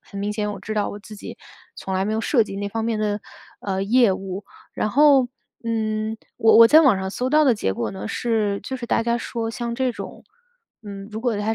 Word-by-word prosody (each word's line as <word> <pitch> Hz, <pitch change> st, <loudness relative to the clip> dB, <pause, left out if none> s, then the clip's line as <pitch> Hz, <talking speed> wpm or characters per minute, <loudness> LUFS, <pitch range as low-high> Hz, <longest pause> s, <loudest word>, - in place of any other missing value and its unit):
很 200 Hz, -, -10 dB
明 205 Hz, +1 st, -2 dB
显 210 Hz, -1 st, -2 dB
我 200 Hz, -, -7 dB
知 215 Hz, -, -5 dB
道 210 Hz, -1 st, 0 dB
我 205 Hz, -, -7 dB
自 210 Hz, +1 st, -12 dB
己 205 Hz, -, -9 dB, 0.4 s
从 190 Hz, -, -4 dB
来 190 Hz, +1 st, +1 dB
没 210 Hz, -, -1 dB
有 220 Hz, -, 0 dB
涉 240 Hz, 0 st, +3 dB
及 195 Hz, -2 st, -7 dB
那 200 Hz, 0 st, -3 dB
方 225 Hz, +2 st, -3 dB
面 230 Hz, -2 st, -1 dB
的， 210 Hz, -1 st, -1 dB, 0.4 s
呃， 190 Hz, -1 st, -2 dB
业 235 Hz, -1 st, +4 dB
务。 190 Hz, +1 st, -5 dB, 0.3 s
然 215 Hz, -, -1 dB
后， 275 Hz, -2 st, +5 dB, 0.3 s
嗯， 220 Hz, -1 st, -2 dB, 0.2 s
我 225 Hz, 0 st, +5 dB
我 230 Hz, -, +10 dB
在 305 Hz, +7 st, +7 dB
网 265 Hz, -11 st, +4 dB
上 190 Hz, 0 st, -3 dB
搜 250 Hz, +6 st, -2 dB
到 305 Hz, +1 st, +5 dB
的 260 Hz, -4 st, +4 dB
结 95 Hz, -, -1 dB
果 115 Hz, -, -3 dB
呢 190 Hz, +2 st, -6 dB
是 220 Hz, -4 st, 0 dB
就 265 Hz, -, -4 dB
是 250 Hz, -, -7 dB
大 230 Hz, -, +1 dB
家 235 Hz, +1 st, 0 dB
说 230 Hz, -1 st, -4 dB
像 235 Hz, +1 st, -4 dB
这 260 Hz, -1 st, 0 dB
种， -, -, -9 dB, 0.6 s
嗯， 200 Hz, -2 st, -8 dB
如 220 Hz, 0 st, -6 dB
果 240 Hz, -2 st, 0 dB
它 210 Hz, +2 st, -1 dB
220 Hz, 255 characters per minute, -22 LUFS, 205-235 Hz, 0.6 s, 我